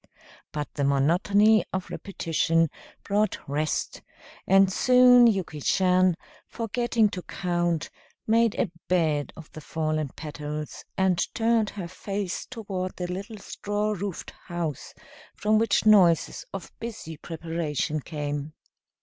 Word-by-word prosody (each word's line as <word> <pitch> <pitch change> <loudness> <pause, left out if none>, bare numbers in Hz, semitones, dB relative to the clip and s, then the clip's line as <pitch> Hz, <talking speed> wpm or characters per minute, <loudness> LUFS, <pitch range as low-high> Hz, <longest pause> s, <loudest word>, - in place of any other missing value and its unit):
But 150 -1 -5
the 145 - -2
monotony 180 +10 +4
of 185 -1 -4
repetition 165 -4 0 0.3
brought 210 +1 +1
rest, 150 +2 -2 0.5
and 195 0 +5
soon 250 0 +7
Yuki 185 -8 -1
Chan, 185 +1 +3 0.3
forgetting 230 0 +1
to 185 - -5
count, 175 -3 -1 0.3
made 225 0 +3
a 195 - 0 0.2
bed 155 -5 +1
of 165 -3 -12
the 155 - -9
fallen 155 -2 -2
petals 150 0 -6
and 185 -2 +2
turned 225 -2 +2
her 190 -4 -6
face 195 +1 -4
toward 195 -6 -5
the 180 0 -4
little 200 +4 -6
straw 205 +1 -3
roofed 200 -2 -4 0.2
house 170 -5 -4 0.4
from 215 +1 +2
which 225 0 +2
noises 185 -6 +4
of 195 -3 -7
busy 220 -8 -6
preparation 160 -2 -3
came. 145 0 -4
180 Hz, 120 wpm, -26 LUFS, 160-210 Hz, 0.5 s, soon